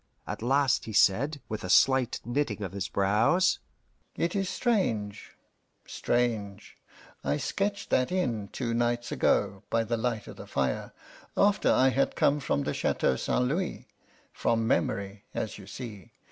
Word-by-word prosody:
At - - -5
last 135 +2 +2
he 110 - -6
said, 135 +10 +3
with 110 - -5
a 90 - -5
slight 130 +3 +4
knitting 120 -4 -1
of 95 - -4
his 95 -2 -3
brows: 105 - +2 0.6
"It 170 +3 -1
is 195 -2 0
strange 115 - -1 0.5
strange. 110 -4 -2 0.5
I 70 +2 0
sketched 200 - -2
that 130 +4 +2
in 120 - -1
two 115 +2 -3
nights 120 0 0
ago, 100 -1 +1
by 115 0 +2
the 115 +1 -1
light 115 -1 -2
of - - -10
the - - -9
fire, 65 -2 -1 0.5
after 205 0 +4
I 130 +1 +5
had 135 +1 +1
come 145 +1 +3
from 70 - -1
the - - -2
Chateau - - +1
St. 125 - 0
Louis 170 +8 -2 0.5
from 115 -1 0
memory, 100 -2 -1
as 110 - -3
you 100 - -12
see. 105 -4 -9
115 Hz, 155 wpm, -28 LUFS, 100-140 Hz, 0.6 s, I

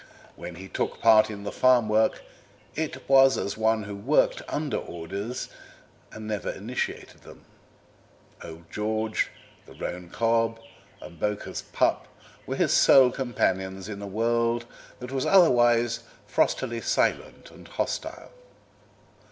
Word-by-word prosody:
When 90 - -8
he 95 +3 -9
took - - -3
part 110 -1 +6
in 100 -2 -7
the 100 - -4
farm 125 -3 +4
work 110 +1 +1 0.5
it 150 -4 -4
was 135 0 +6
as 100 - -3
one 110 0 +1
who 100 0 -7
worked 120 +10 +1
under 150 -1 -2
orders 100 +8 -5 0.6
and 110 - -9
never 105 -2 -3
initiated 115 +6 -5
them. - - -15 1.0
Old 85 0 -11
George, 110 +1 -1 0.4
the - - -14
roan 90 0 -6
cob, 115 +2 +1 0.4
and 85 - -12
Bowker's 105 -1 -3
pup - - +1 0.4
were - - -2
his - - +1
sole 130 -2 +6
companions 95 -7 -2
in 100 -2 -7
a 100 - -6
world 115 +3 0 0.3
that 125 0 -8
was 135 -1 -1
otherwise 120 -9 +4 0.3
frostily - - 0
silent - - -1
and - - -15
hostile. - - -4
110 Hz, 130 wpm, -26 LUFS, 100-120 Hz, 1.0 s, part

